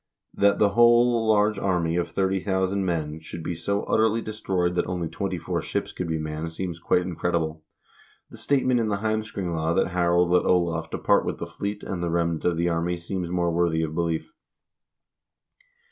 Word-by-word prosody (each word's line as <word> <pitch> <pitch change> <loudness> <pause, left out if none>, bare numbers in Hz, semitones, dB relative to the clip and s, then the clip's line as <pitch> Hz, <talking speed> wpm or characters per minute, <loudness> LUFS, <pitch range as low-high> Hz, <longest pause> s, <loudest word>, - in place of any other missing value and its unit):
That 100 0 +3
the 105 - +4
whole 120 +1 +4
large 105 -1 +3
army 85 -4 0
of 85 -1 -1
30,000 95 0 0
men 80 -4 -2
should 80 +1 -8
be 90 - -2
so 100 +5 -2
utterly 110 +1 +2
destroyed 95 -5 -1
that 90 - 0
only 90 -2 -2
twenty - - -3
four - - -3
ships - - -3
could 90 - -4
be 80 -1 -1
manned 80 +1 -4
seems 85 0 -5
quite 90 +1 +2
incredible. 80 -3 -2 0.7
The - - -11
statement 130 -3 +2
in 115 - 0
the 100 -1 -1
"Heims 110 0 -1
kringla" 85 -3 -1
that - - +2
Harold 85 0 +2
let 90 - +4
Olav 85 -2 +1
depart - - +2
with - - -3
the - - -5
fleet 100 +1 -5
and 90 -3 -4
the 85 - -1
remnant 85 -1 0
of 85 -2 +2
the 85 +1 +1
army 85 +1 0
seems 85 0 -4
more 85 -1 0
worthy 85 -1 +1
of 80 -1 -3
belief. 85 -1 -2
90 Hz, 185 wpm, -25 LUFS, 85-100 Hz, 0.7 s, the